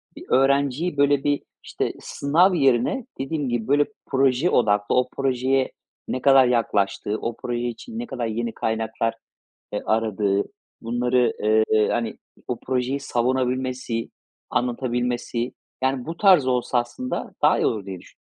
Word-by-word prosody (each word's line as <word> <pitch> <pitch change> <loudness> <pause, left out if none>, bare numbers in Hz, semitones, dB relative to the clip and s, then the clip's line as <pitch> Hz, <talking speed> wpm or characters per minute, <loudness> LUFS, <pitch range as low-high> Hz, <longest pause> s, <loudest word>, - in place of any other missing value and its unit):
bir - - -10
öğrenciyi 140 +4 +2
böyle 140 -1 +3
bir, 145 0 0 0.2
işte, - - -3
sınav 170 +7 +2
yerine, 135 - +2
dediğim 135 0 -2
gibi, 120 -1 -2
böyle 145 +1 +4 0.2
proje 135 +4 +2
odaklı 105 -3 +2
o 125 0 +2
projeye 130 0 +1 0.4
ne 130 - -3
kadar 135 -2 +6
yaklaştığı, 105 -3 0
o 115 - -3
proje 120 0 -3
için 225 - -7
ne 240 - -3
kadar 125 - -4
yeni 115 +1 -3
kaynaklar, 110 0 -1 0.6
eee, 105 - -2
aradığı, 105 -2 +1 0.4
bunları, 120 +1 +1
eee, 110 0 +3
hani, 115 -2 -2 0.3
o - - -2
projeyi 130 +2 -1
savunabilmesi, 125 -2 -1 0.4
anlatabilmesi, 120 0 -1 0.3
yani, 130 0 0
bu 165 - -5
tarz 185 -10 +5
olsa 125 -1 +1
aslında 120 +1 -4
daha - - +5
iyi - - +2
olur 105 -3 -1
diye 95 -2 -6
düşünüyorum. - - -18
125 Hz, 140 wpm, -23 LUFS, 115-135 Hz, 0.6 s, kadar